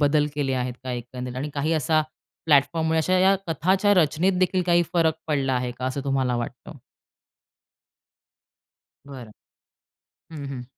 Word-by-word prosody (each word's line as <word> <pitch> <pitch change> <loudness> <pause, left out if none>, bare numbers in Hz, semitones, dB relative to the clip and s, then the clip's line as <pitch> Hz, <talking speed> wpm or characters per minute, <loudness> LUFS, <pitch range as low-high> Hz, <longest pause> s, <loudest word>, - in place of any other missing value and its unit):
बदल 150 0 +3
केले 140 -2 -1
आहेत 125 -1 -2
का 130 - -4
एकंदरीत? 125 +1 -6
आणि 140 +3 -3
काही 150 +3 0
असा 155 +1 +2 0.4
प्लॅटफॉर्ममुळे 160 +2 +3
अशा 185 +4 +2
या 190 +1 +5
कथाच्या 190 +5 +2
रचनेत 165 +2 +2
देखील 185 0 +1
काही 175 -1 +4
फरक 165 -3 +2
पडला 140 -4 0
आहे 125 0 -1
का, 125 - -4
असं 130 +2 -2
तुम्हाला 130 -3 0
वाटतं? 120 - -7 2.3
बरं. 130 -6 -10 1.0
हं, 150 -3 -7
हं. 130 -3 -6
145 Hz, 140 wpm, -24 LUFS, 130-165 Hz, 2.3 s, या